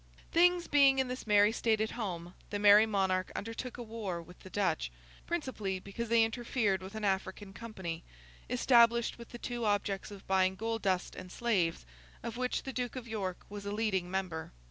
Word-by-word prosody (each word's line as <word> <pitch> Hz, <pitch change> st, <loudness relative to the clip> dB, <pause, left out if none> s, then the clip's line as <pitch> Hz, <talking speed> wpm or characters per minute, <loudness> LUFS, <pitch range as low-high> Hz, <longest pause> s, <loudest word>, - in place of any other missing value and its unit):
Things 350 Hz, +1 st, +4 dB
being 275 Hz, -2 st, +5 dB
in 260 Hz, -1 st, +1 dB
this 250 Hz, -2 st, -5 dB
merry 205 Hz, 0 st, +6 dB
state 225 Hz, -1 st, +1 dB
at 220 Hz, 0 st, 0 dB
home, 180 Hz, -6 st, -4 dB, 0.2 s
the 205 Hz, -, -2 dB
Merry 205 Hz, +1 st, +7 dB
Monarch 190 Hz, -3 st, +1 dB
undertook 230 Hz, +3 st, -5 dB
a 240 Hz, -, -5 dB
war 215 Hz, -6 st, -4 dB
with 180 Hz, +2 st, -13 dB
the 190 Hz, -, -12 dB
Dutch; 185 Hz, -, 0 dB, 0.4 s
principally 260 Hz, -, -2 dB
because 200 Hz, +5 st, -6 dB
they 230 Hz, -1 st, +5 dB
interfered 225 Hz, -4 st, 0 dB
with 190 Hz, +3 st, -9 dB
an 220 Hz, -1 st, -2 dB
African 195 Hz, 0 st, -2 dB
company, 190 Hz, -7 st, -6 dB, 0.5 s
established 235 Hz, -1 st, +4 dB
with 235 Hz, -, -10 dB
the 240 Hz, -, -8 dB
two 240 Hz, 0 st, -4 dB
objects 205 Hz, -2 st, 0 dB
of 200 Hz, -2 st, -11 dB
buying 190 Hz, 0 st, +3 dB
gold 225 Hz, +2 st, -2 dB
dust 185 Hz, -2 st, 0 dB
and 185 Hz, 0 st, -9 dB
slaves, 185 Hz, -, 0 dB, 0.4 s
of 235 Hz, -, -4 dB
which 250 Hz, +1 st, -1 dB
the 265 Hz, -, -5 dB
Duke 250 Hz, 0 st, -3 dB
of 250 Hz, -2 st, -6 dB
York 195 Hz, -5 st, -4 dB
was 205 Hz, 0 st, -7 dB
a 200 Hz, -, -4 dB
leading 205 Hz, -4 st, 0 dB
member. 180 Hz, -4 st, -3 dB
210 Hz, 190 wpm, -32 LUFS, 190-235 Hz, 0.5 s, Merry